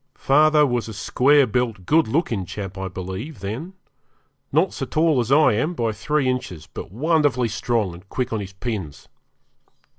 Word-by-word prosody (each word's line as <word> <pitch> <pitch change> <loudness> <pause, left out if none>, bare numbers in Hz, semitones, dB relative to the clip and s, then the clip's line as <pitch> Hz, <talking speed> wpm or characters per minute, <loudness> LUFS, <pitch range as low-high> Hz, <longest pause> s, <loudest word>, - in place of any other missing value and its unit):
Father 150 +2 +4
was 120 -4 -1
a 110 - -7
square 140 +7 +3
built, 115 -5 -2
good 160 - +3
looking 115 - 0
chap, 95 +1 -6
I 95 0 -4
believe, 95 - -6
then; 115 - -5 0.8
not 160 +6 +2
so 135 - -4
tall 155 0 +2
as 120 +1 -1
I 150 -3 +5
am 150 +11 -1
by 115 -6 0
three 145 +6 -1
inches, 95 -11 -3
but - - -9
wonderfully 140 - +1
strong 110 -3 -1
and 90 +3 -14
quick 125 -2 -2
on 110 - -1
his 100 -1 -7
pins. 95 - -5
120 Hz, 170 wpm, -22 LUFS, 100-150 Hz, 0.8 s, I